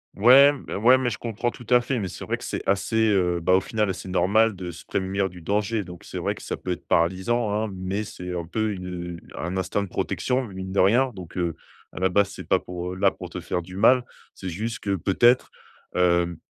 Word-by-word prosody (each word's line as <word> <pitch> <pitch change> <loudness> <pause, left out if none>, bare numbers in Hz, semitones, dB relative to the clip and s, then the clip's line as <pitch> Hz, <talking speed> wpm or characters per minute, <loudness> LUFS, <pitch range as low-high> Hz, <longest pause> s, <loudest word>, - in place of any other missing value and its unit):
Ouais, 130 +7 +8
b 140 - -11
ouais, 125 +6 +4
mais 125 -2 0
je 105 - -4
comprends 115 +1 -2
tout 120 0 -11
à 125 0 +6
fait. 125 +2 -2
Mais 100 -5 -2
c'est - - -8
vrai - - -2
que - - -12
c'est - - -3
assez, 110 +3 +2
heu, 90 -3 +2
bah, 90 +2 +3
au 95 - +6
final, 105 +1 -1
assez 95 0 -5
normal 105 +4 +3
de 90 -1 -6
se 85 - -10
prémunir 95 +1 -1
du 90 -1 -11
danger. 105 +4 0
Donc 90 -1 -11
c'est - - -6
vrai - - -1
que - - -12
ça - - -3
peut 90 - -5
être 90 - -5
paralysant, 95 +7 +1
hein, 110 +2 0
mais 95 +3 -3
c'est 90 -3 -7
un 85 - -4
peu 110 +5 -1
une, 90 -2 -7 0.3
heu, - - -8 0.2
un 90 +3 -3
instinct 95 +2 -1
de 100 - -4
protection, 130 +7 -1
mine 95 -3 -7
de 100 - 0
rien, 120 +8 +4
donc, 90 -3 -10
heu, 85 -2 -1 0.4
à - - -7
la 95 0 +2
base, 100 +1 +3
c'est - - -9
pas - - +3
pour 90 0 -6
là 95 +1 +4
pour 90 -2 -9
te - - -5
faire 90 0 -3
du 90 +2 -11
mal. 125 +5 +5 0.3
C'est 95 - -6
juste 110 +8 -4
que 100 -1 0
peut-être, 120 +8 +3 0.5
hem, 85 -1 +2
95 Hz, 245 wpm, -25 LUFS, 90-110 Hz, 0.5 s, Ouais